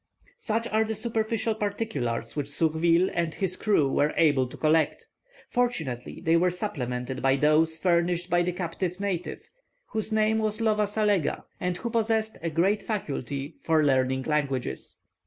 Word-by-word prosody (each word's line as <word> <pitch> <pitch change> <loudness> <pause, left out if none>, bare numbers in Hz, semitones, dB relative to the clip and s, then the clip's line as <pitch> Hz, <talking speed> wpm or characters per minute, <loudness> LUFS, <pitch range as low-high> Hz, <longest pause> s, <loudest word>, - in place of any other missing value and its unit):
Such 230 - -1
are 220 +1 +2
the 220 0 -3
superficial 225 0 -1
particulars 200 - -3
which 145 -2 -2
Surville 165 +4 +2
and 170 -2 -1
his 185 -2 0
crew 195 -10 +2
were 145 +2 +1
able 145 -5 +3
to - - -11
collect. 155 0 +1 0.4
Fortunately, 160 - -2
they 165 +1 +4
were 180 +2 +4
supplemented 130 - -4
by 135 0 +3
those 155 +3 +3
furnished 175 0 +1
by 175 -1 +2
the 180 +1 0
captive 180 +1 -3
native, 190 -4 -4 0.4
whose 220 0 -2
name 220 0 +2
was 215 -1 0
Lova 215 -2 +2
Salega, 205 -6 +1 0.2
and 180 -1 -1
who 235 +5 -4
possessed 220 -1 0
a 165 - -1
great 190 +6 +1
faculty 145 - -4
for 160 -2 +2
learning 130 -2 +2
languages. 135 - -2
175 Hz, 155 wpm, -27 LUFS, 150-215 Hz, 0.4 s, they